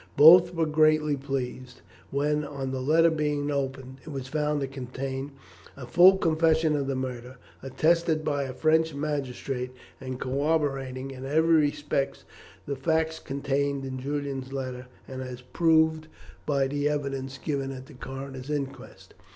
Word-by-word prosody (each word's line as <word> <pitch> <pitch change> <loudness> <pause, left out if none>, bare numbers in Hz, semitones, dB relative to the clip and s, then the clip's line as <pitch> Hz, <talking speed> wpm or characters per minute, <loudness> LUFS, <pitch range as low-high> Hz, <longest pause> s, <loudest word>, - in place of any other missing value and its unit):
Both 175 +4 +8
were 165 -1 +2
greatly 155 -1 +3
pleased 130 -2 -5 0.3
when, 150 +2 0
on 140 -2 -4
the 130 -1 -3
letter 165 +5 +4
being 150 -2 -1
opened, 135 -1 -3
it - - -10
was 135 -3 -5
found 150 +1 0
to 135 - -1
contain 135 +1 -5 0.5
a 135 - -7
full 175 +9 +7
confession 160 -2 +2
of 140 -2 -1
the 135 - -1
murder, 130 0 -5 0.2
attested 160 +4 +1
by 145 -2 0
a 130 - -6
French 160 0 +2
magistrate, 135 -3 -3 0.3
and 130 -1 -6
corroborating 135 -2 -1
in 130 -1 -9
every 160 +4 +2
respect 145 -2 0 0.4
the 140 - -3
facts 160 +3 0
contained 140 0 -2
in 130 -1 -5
Julian's 140 -1 -4
letter, 130 -2 -5 0.2
and 130 0 -6
as 125 -1 -7
proved 160 +4 +2 0.4
by 140 -2 +2
the 145 +2 0
evidence 135 -2 -3
given 135 -2 -3
at 130 -1 -8
the 150 - -14
coroner's 135 +1 -7
inquest. 140 -2 -5
140 Hz, 150 wpm, -27 LUFS, 130-155 Hz, 0.5 s, Both